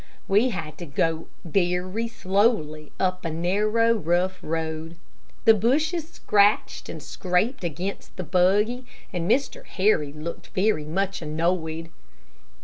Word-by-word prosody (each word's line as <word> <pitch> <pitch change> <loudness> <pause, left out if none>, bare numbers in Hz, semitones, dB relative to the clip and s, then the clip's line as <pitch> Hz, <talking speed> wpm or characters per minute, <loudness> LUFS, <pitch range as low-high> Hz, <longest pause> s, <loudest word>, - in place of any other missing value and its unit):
We 210 +6 +4
had 160 - -5
to 175 - -6
go 160 +3 0 0.2
very 180 +5 0
slowly 190 -8 0
up 185 -1 0
a 165 - -2
narrow, 210 +8 +2
rough 185 -1 0
road. 160 0 -3 0.5
The 225 - +9
bushes 305 - +1
scratched 205 0 +2
and - - -7
scraped 190 +7 -1
against 175 +4 -4
the 185 - -3
buggy, 205 +8 +2 0.3
and 175 -1 -2
Mr. 275 +2 +1
Harry 185 -7 +1
looked 155 +3 -7
very 190 -6 +2
much 195 +5 -1
annoyed. 165 +1 -1
185 Hz, 125 wpm, -25 LUFS, 165-210 Hz, 0.5 s, The